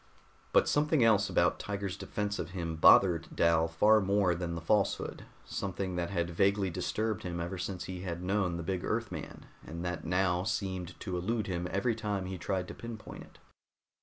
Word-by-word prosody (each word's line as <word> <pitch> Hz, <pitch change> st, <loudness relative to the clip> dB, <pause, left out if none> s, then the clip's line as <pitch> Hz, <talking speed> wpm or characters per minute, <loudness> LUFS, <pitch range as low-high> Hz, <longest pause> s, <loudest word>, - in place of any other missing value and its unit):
But -, -, +4 dB
something 150 Hz, -2 st, +3 dB
else 105 Hz, -2 st, +4 dB
about -, -, +2 dB
Tiger's 100 Hz, -2 st, -3 dB
defense 105 Hz, 0 st, -3 dB
of 80 Hz, -, -3 dB
him 85 Hz, -2 st, -3 dB
bothered 85 Hz, +1 st, +6 dB
Dal 85 Hz, -1 st, +3 dB
far 105 Hz, +7 st, +4 dB
more 100 Hz, -2 st, +2 dB
than 85 Hz, -1 st, -3 dB
the -, -, -3 dB
falsehood 100 Hz, +4 st, 0 dB, 0.2 s
something 95 Hz, -1 st, -3 dB
that 85 Hz, -1 st, -1 dB
had 85 Hz, -3 st, -1 dB
vaguely 100 Hz, +2 st, +2 dB
disturbed 110 Hz, +4 st, -2 dB
him 85 Hz, -1 st, -4 dB
ever 90 Hz, +2 st, -4 dB
since 90 Hz, 0 st, -4 dB
he 90 Hz, -1 st, -6 dB
had 90 Hz, -1 st, -4 dB
known 95 Hz, -2 st, 0 dB
the 85 Hz, -, -4 dB
big 90 Hz, +1 st, -2 dB
Earthman, -, -, -4 dB, 0.2 s
and 85 Hz, +3 st, -6 dB
that 90 Hz, -1 st, -3 dB
now 90 Hz, +1 st, +1 dB
seemed 95 Hz, -4 st, -3 dB
to 90 Hz, -3 st, -3 dB
elude 110 Hz, +3 st, -1 dB
him 90 Hz, -3 st, -2 dB
every 100 Hz, +6 st, +1 dB
time 105 Hz, -4 st, -2 dB
he 95 Hz, -1 st, -5 dB
tried 95 Hz, +1 st, -2 dB
to -, -, -6 dB
pinpoint 115 Hz, -2 st, -8 dB
it. -, -, -15 dB
95 Hz, 185 wpm, -31 LUFS, 85-105 Hz, 0.2 s, bothered